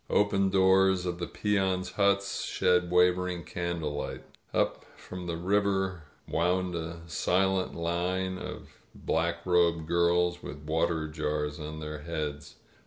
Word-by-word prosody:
Open 100 -1 +3
doors 95 -1 +4
of 90 -1 -3
the 85 - -3
peons' 95 -3 0
huts 100 +1 +1
shed 90 -1 +2
wavering 90 0 +2
candlelight. 85 -4 -3 0.3
Up - - 0
from 90 -1 -8
the 85 -1 -2
river 95 -2 0 0.2
wound 90 +2 +1
a 85 0 -5
silent 95 +3 +1
line 90 +2 -1
of - - -7 0.3
black 85 +1 -1
robed 85 -3 +3
girls 85 +1 +2
with 75 0 -8
water 80 +1 0
jars 75 0 -2
on 75 +1 -6
their 75 0 -5
heads. 75 -2 -5
90 Hz, 125 wpm, -29 LUFS, 80-95 Hz, 0.3 s, doors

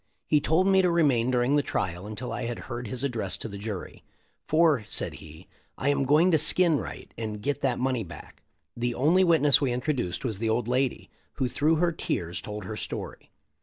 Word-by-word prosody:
He 150 -1 +3
told 160 +6 +2
me 190 -1 +5
to 180 - +2
remain 140 -8 +3
during 125 +2 +2
the - - +4
trial 95 -7 -3
until 110 +4 -6
I - - -3
had 120 -1 -3 0.2
heard 120 0 -5
his 130 +4 -4
address 115 -8 -2
to - - -6
the 100 -2 -8
jury. 105 -3 -6 0.4
'Tor," 155 -6 +3
said - - -2
he, 80 +3 -13 0.3
"I 140 - 0
am 140 -1 +1
going 155 +7 +4
to 160 - +4
skin 165 0 +3
Wright, - - -8
and 110 -2 -4
get 145 +6 -2
that 135 -3 +1
money 130 -2 0
back." 85 - -12 0.3
The 120 0 -2
only 165 +8 +4
witness 155 -6 +4
we 135 -3 +1
introduced 125 - -2
was 110 -5 -2
the 115 0 0
old 115 +1 0
lady, 130 +1 -1 0.2
who 130 - -1
through 150 +5 +2
her 170 +2 +2
tears 90 - -3
told 105 +2 -6
her 110 - -5
story. - - -6
125 Hz, 205 wpm, -27 LUFS, 110-150 Hz, 0.4 s, me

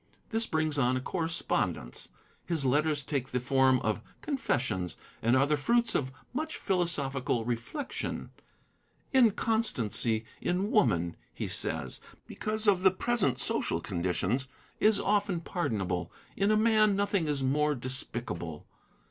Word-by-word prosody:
This 225 0 +1
brings 155 -2 0
on 130 0 +2
a - - 0
correspondence. 165 - -2 0.4
His 160 -5 +1
letters 145 +2 +2
take 135 -2 -2
the 125 - 0
form 130 0 +3
of 110 -2 -1 0.2
confessions, 125 - -1 0.3
and 115 +3 +3
are 135 +1 +5
the 150 +1 +2
fruits 235 +9 +2
of 130 -2 0 0.2
much 310 +4 -3
philosophical 140 - 0
reflection. 120 - -4 0.8
'Inconstancy 215 - +2 0.2
in 190 +5 0
woman,' 85 - +2 0.2
he - - -3
says, - - -2 0.2
because 215 0 -3
of 195 -3 +4
the 190 - +7
present 185 - 0
social 85 - 0
conditions, 95 +8 -1 0.3
is 215 -1 +4
often 205 -3 +1
pardonable. 95 - -2 0.2
In 200 +1 +2
a 215 - +4
man, 215 -2 +4
nothing 200 -4 +1
is 145 -2 0
more 150 +3 +2
despicable.' 120 - -4
145 Hz, 130 wpm, -30 LUFS, 125-205 Hz, 0.8 s, the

